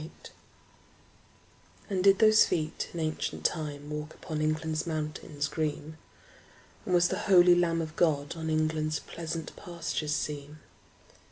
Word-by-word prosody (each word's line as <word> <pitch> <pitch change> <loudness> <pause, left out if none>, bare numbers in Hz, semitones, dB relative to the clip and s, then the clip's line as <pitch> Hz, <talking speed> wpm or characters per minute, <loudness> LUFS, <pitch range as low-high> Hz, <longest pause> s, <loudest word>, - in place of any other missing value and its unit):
Y - - -6
Z - - -10
Jerusalem - - -16 1.6
AND 185 -2 0
did 195 0 +6
those 220 -1 +7
feet 155 -1 -2
in 170 - -6
ancient 155 -1 -3
time 145 -3 -2
Walk 150 +1 -5
upon 155 -1 -5
England's 155 +1 -1
mountains 155 -2 -3
green? 155 +1 -3 0.9
And 180 - +2
was 175 0 +4
the 190 - -2
holy 180 -2 +8
Lamb 165 -1 +2
of 155 0 -8
God 145 -3 +1
On 160 -1 -4
England's 155 0 0
pleasant 165 -1 -6
pastures 165 -3 -3
seen? 150 0 -4
155 Hz, 145 wpm, -29 LUFS, 155-170 Hz, 1.6 s, holy